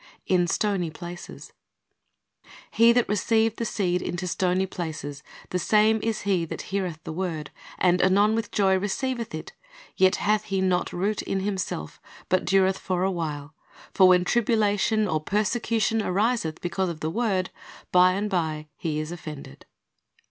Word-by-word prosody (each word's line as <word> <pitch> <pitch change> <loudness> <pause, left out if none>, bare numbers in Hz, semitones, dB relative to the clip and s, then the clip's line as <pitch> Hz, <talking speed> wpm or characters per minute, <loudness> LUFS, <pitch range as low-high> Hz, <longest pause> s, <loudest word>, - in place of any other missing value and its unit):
IN 180 -2 +2
STONY 190 -2 0
PLACES 175 +3 -9 1.2
"He 230 +1 +6
that 240 0 +2
received 220 +2 +1
the 230 - -2
seed 180 -5 0
into 175 +1 -3
stony 180 +2 +1
places, 155 -6 -6 0.3
the 180 - 0
same 215 +3 +3
is 225 -1 -2
he 190 -4 +1
that - - -6
heareth 180 -5 -2
the - - -6
word, 160 -4 -4 0.3
and 180 -1 +3
anon 200 +3 +4
with 225 -1 -2
joy 195 -2 +2
receiveth 230 +1 -2
it; 155 - -8 0.4
yet 190 +1 +4
hath 210 +1 +1
he 195 -1 -1
not 185 -1 +1
root 200 +4 -1
in 195 - -2
himself, 190 - -4 0.3
but 185 0 +2
dureth 190 0 +3
for 185 -1 -1
a 190 - +1
while; 155 -4 -4 0.4
for 190 -2 +6
when 180 -1 +5
tribulation 215 -1 +2
or 155 -3 0
persecution 220 +3 0
ariseth 200 -4 0
because 185 +1 -1
of 160 -2 -7
the 155 - -2
word, 195 -4 0 0.4
by 180 0 +6
and 200 +3 -1
by 160 -5 -2
he 155 -3 -2
is 155 +1 -4
offended." 155 - -9
190 Hz, 155 wpm, -25 LUFS, 175-210 Hz, 1.2 s, He